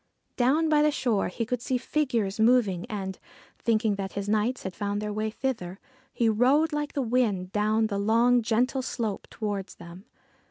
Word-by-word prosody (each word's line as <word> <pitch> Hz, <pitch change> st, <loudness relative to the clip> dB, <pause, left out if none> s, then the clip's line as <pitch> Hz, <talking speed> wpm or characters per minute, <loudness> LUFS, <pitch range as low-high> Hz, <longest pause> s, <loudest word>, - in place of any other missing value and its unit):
Down 280 Hz, +6 st, +2 dB
by 305 Hz, -1 st, +4 dB
the 300 Hz, -, +4 dB
shore 240 Hz, -8 st, 0 dB
he 230 Hz, +6 st, -3 dB
could 250 Hz, 0 st, -2 dB
see 255 Hz, 0 st, 0 dB
figures 240 Hz, -7 st, -1 dB
moving, 220 Hz, -6 st, +3 dB
and, 190 Hz, -3 st, -5 dB, 0.4 s
thinking 220 Hz, -3 st, +1 dB
that 195 Hz, -1 st, -4 dB
his 200 Hz, 0 st, -4 dB
knights 215 Hz, +4 st, 0 dB
had 190 Hz, -, -5 dB
found 205 Hz, +2 st, -2 dB
their 210 Hz, 0 st, -3 dB
way 215 Hz, +1 st, -1 dB
thither, 215 Hz, -7 st, -4 dB, 0.3 s
he 235 Hz, -, +1 dB
rode 265 Hz, +8 st, +3 dB
like 295 Hz, 0 st, -2 dB
the 275 Hz, -, -1 dB
wind 220 Hz, -7 st, 0 dB
down 215 Hz, +2 st, +1 dB
the 200 Hz, -2 st, -2 dB
long, 235 Hz, +4 st, +3 dB
gentle 240 Hz, +4 st, +1 dB
slope 225 Hz, -5 st, -3 dB
towards 205 Hz, -3 st, -4 dB
them. 175 Hz, +4 st, -12 dB
220 Hz, 175 wpm, -27 LUFS, 200-250 Hz, 0.4 s, by